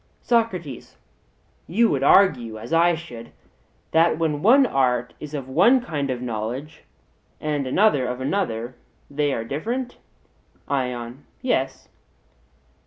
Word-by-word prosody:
SOCRATES: 185 Hz, -, -1 dB, 0.7 s
You 225 Hz, +7 st, +3 dB
would 135 Hz, -, 0 dB
argue, 130 Hz, -, +4 dB
as 115 Hz, +8 st, -7 dB
I 170 Hz, +1 st, +4 dB
should, 120 Hz, -9 st, -10 dB, 0.6 s
that 165 Hz, +1 st, +3 dB
when 155 Hz, -3 st, -1 dB
one 265 Hz, -, +6 dB
art 125 Hz, -, 0 dB
is 150 Hz, 0 st, -7 dB
of 135 Hz, -3 st, -5 dB
one 210 Hz, -, +4 dB
kind 150 Hz, -, -3 dB
of 125 Hz, -1 st, -3 dB
knowledge 120 Hz, +6 st, -5 dB, 0.5 s
and 145 Hz, -3 st, -2 dB
another 145 Hz, -4 st, +3 dB
of 125 Hz, 0 st, -4 dB
another, 130 Hz, -, -2 dB, 0.4 s
they 145 Hz, 0 st, 0 dB
are 115 Hz, -, -2 dB
different? 235 Hz, -, -4 dB, 0.7 s
ION: 125 Hz, -1 st, -3 dB, 0.2 s
Yes. 135 Hz, -, -1 dB
145 Hz, 120 wpm, -23 LUFS, 125-175 Hz, 0.7 s, one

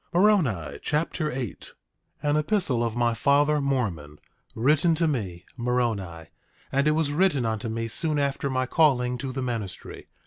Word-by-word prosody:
Moroni 140 Hz, -, +2 dB
Chapter 150 Hz, 0 st, -1 dB
8 125 Hz, -7 st, -6 dB, 0.5 s
8:1 -, -, +2 dB
An -, -, +2 dB
epistle 150 Hz, -, +1 dB
of 115 Hz, -1 st, -2 dB
my 120 Hz, -1 st, +2 dB
father 145 Hz, +4 st, +3 dB
Mormon, 100 Hz, -, -2 dB, 0.4 s
written 150 Hz, +7 st, +3 dB
to 165 Hz, +1 st, +1 dB
me, 95 Hz, -, -3 dB
Moroni; 115 Hz, -9 st, -2 dB, 0.5 s
and 140 Hz, +2 st, +2 dB
it 150 Hz, -, +4 dB
was 155 Hz, -2 st, 0 dB
written 150 Hz, -5 st, +2 dB
unto 110 Hz, +1 st, -2 dB
me 115 Hz, +1 st, -3 dB
soon 155 Hz, +6 st, 0 dB
after 140 Hz, -1 st, -1 dB
my 130 Hz, -1 st, 0 dB
calling 125 Hz, -4 st, +2 dB
to 130 Hz, +1 st, -4 dB
the 130 Hz, 0 st, -3 dB
ministry. 110 Hz, -8 st, -5 dB
130 Hz, 160 wpm, -26 LUFS, 115-150 Hz, 0.5 s, it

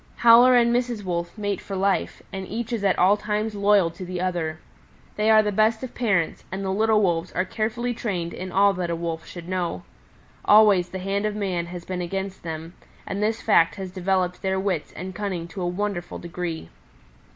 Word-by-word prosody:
"Howler 240 Hz, +2 st, +7 dB
and 235 Hz, -1 st, +4 dB
Mrs. 240 Hz, -3 st, -1 dB
Wolf 170 Hz, +1 st, -3 dB
mate 205 Hz, -2 st, -2 dB
for 195 Hz, -, -6 dB
life, 195 Hz, +1 st, 0 dB
and 190 Hz, -1 st, -5 dB
each 230 Hz, +2 st, -4 dB
is 220 Hz, -3 st, -2 dB
at 195 Hz, -2 st, +2 dB
all 190 Hz, +3 st, +5 dB
times 210 Hz, +1 st, -2 dB
loyal 200 Hz, -4 st, +3 dB
to 170 Hz, -, -9 dB
the 180 Hz, 0 st, -5 dB
other. 175 Hz, -4 st, -2 dB, 0.6 s
They 210 Hz, +1 st, +1 dB
are 215 Hz, -1 st, +7 dB
the 210 Hz, -, 0 dB
best 220 Hz, +3 st, +2 dB
of 255 Hz, -, -6 dB
parents, 200 Hz, -9 st, 0 dB
and 195 Hz, +1 st, -4 dB
the 190 Hz, -, -1 dB
little 215 Hz, +1 st, +3 dB
Wolves 170 Hz, -1 st, 0 dB
are 180 Hz, -, 0 dB
carefully 230 Hz, +5 st, -2 dB
trained 180 Hz, -7 st, -3 dB
in 185 Hz, 0 st, -6 dB
all 200 Hz, +2 st, +4 dB
that 180 Hz, -2 st, -3 dB
a 170 Hz, -, 0 dB
Wolf 165 Hz, -1 st, -4 dB
should 175 Hz, -1 st, -9 dB
know. 175 Hz, -, -2 dB, 0.6 s
Always 205 Hz, -4 st, +6 dB
the 190 Hz, -, -5 dB
hand 195 Hz, +3 st, -1 dB
of 210 Hz, -, -3 dB
man 185 Hz, -5 st, -2 dB
has 175 Hz, -1 st, -8 dB
been 185 Hz, -1 st, -3 dB
against 190 Hz, +2 st, -4 dB
them, 165 Hz, +1 st, -6 dB, 0.3 s
and 200 Hz, -, -4 dB
this 220 Hz, +2 st, 0 dB
fact 165 Hz, -6 st, +4 dB
has 190 Hz, -2 st, -6 dB
developed 185 Hz, -1 st, -1 dB
their 190 Hz, 0 st, 0 dB
wits 190 Hz, -5 st, -2 dB
and 185 Hz, +2 st, -7 dB
cunning 185 Hz, -4 st, -4 dB
to 190 Hz, -, -7 dB
a 175 Hz, -, -1 dB
wonderful 180 Hz, -1 st, -3 dB
degree. 170 Hz, -, -5 dB
190 Hz, 205 wpm, -24 LUFS, 175-210 Hz, 0.6 s, Howler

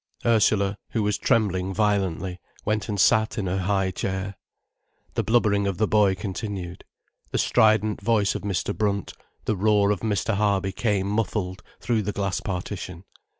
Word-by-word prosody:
Ursula, 105 Hz, -3 st, +3 dB, 0.2 s
who 110 Hz, -, +1 dB
was 105 Hz, 0 st, 0 dB
trembling 95 Hz, -5 st, +1 dB
violently, 95 Hz, -4 st, 0 dB, 0.3 s
went 105 Hz, 0 st, -1 dB
and 100 Hz, -1 st, -2 dB
sat 110 Hz, +3 st, +3 dB
in 105 Hz, -, -1 dB
her 95 Hz, +1 st, -1 dB
high 95 Hz, 0 st, +1 dB
chair. 95 Hz, +1 st, -3 dB, 0.8 s
The -, -, +1 dB
blubbering 105 Hz, -4 st, +2 dB
of 95 Hz, -3 st, -2 dB
the 110 Hz, -, +2 dB
boy 100 Hz, -2 st, +3 dB
continued. 95 Hz, -2 st, -5 dB, 0.5 s
The -, -, -2 dB
strident 110 Hz, -1 st, +3 dB
voice 105 Hz, -1 st, +2 dB
of -, -, -4 dB
Mr. 100 Hz, 0 st, -2 dB
Brunt, 100 Hz, -2 st, -1 dB, 0.3 s
the 110 Hz, -, +1 dB
roar 105 Hz, +1 st, +3 dB
of 100 Hz, -, 0 dB
Mr. 110 Hz, 0 st, 0 dB
Harby, 100 Hz, -2 st, +1 dB
came 100 Hz, -1 st, 0 dB
muffled 100 Hz, -3 st, -2 dB, 0.2 s
through 115 Hz, -2 st, 0 dB
the 105 Hz, 0 st, -2 dB
glass 100 Hz, -1 st, -1 dB
partition. 90 Hz, -2 st, -5 dB
100 Hz, 155 wpm, -25 LUFS, 95-105 Hz, 0.8 s, Ursula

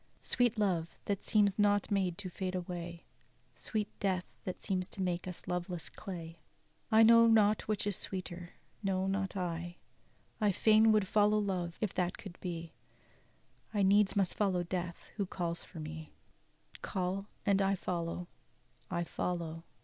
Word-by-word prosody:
"Sweet 240 Hz, -2 st, +1 dB
love, 180 Hz, -6 st, 0 dB
that 200 Hz, -1 st, -1 dB
seems 205 Hz, -2 st, +3 dB
not 205 Hz, -1 st, +3 dB
made 185 Hz, -4 st, +1 dB
to 205 Hz, -, -5 dB
fade 185 Hz, +1 st, -3 dB
away; 175 Hz, -1 st, -5 dB, 0.5 s
Sweet 215 Hz, -2 st, -2 dB
death, 185 Hz, -2 st, 0 dB, 0.2 s
that 185 Hz, -, -4 dB
seems 185 Hz, -3 st, 0 dB
to -, -, -6 dB
make 180 Hz, 0 st, -1 dB
us 180 Hz, -, -6 dB
loveless 180 Hz, -1 st, -3 dB
clay, 170 Hz, -4 st, -8 dB, 0.5 s
I 220 Hz, +1 st, +7 dB
know 230 Hz, +1 st, +8 dB
not 215 Hz, -2 st, +4 dB
which 215 Hz, -2 st, 0 dB
is 205 Hz, -2 st, +1 dB
sweeter, 180 Hz, -2 st, -5 dB, 0.3 s
no, 190 Hz, -2 st, 0 dB
not 195 Hz, 0 st, -1 dB
I. 175 Hz, -1 st, -3 dB, 0.7 s
"I 205 Hz, -2 st, +3 dB
fain 220 Hz, +3 st, +5 dB
would 210 Hz, -3 st, +3 dB
follow 210 Hz, +1 st, +4 dB
love, 185 Hz, -4 st, -1 dB
if 215 Hz, -4 st, 0 dB
that 180 Hz, 0 st, -1 dB
could 195 Hz, -5 st, -10 dB
be; 170 Hz, -2 st, -5 dB, 1.0 s
I 205 Hz, -, +3 dB
needs 200 Hz, +1 st, +4 dB
must 195 Hz, -3 st, +2 dB
follow 190 Hz, -4 st, +1 dB
death, 175 Hz, -1 st, -4 dB
who 200 Hz, -3 st, 0 dB
calls 170 Hz, -2 st, -3 dB
for 165 Hz, -, -11 dB
me; 155 Hz, 0 st, -7 dB, 0.7 s
Call 190 Hz, +1 st, -2 dB, 0.2 s
and 200 Hz, -1 st, +3 dB
I 195 Hz, 0 st, +3 dB
follow, 175 Hz, -1 st, -3 dB, 0.6 s
I 170 Hz, -, 0 dB
follow'! 170 Hz, -1 st, -3 dB
185 Hz, 155 wpm, -33 LUFS, 175-205 Hz, 1.0 s, know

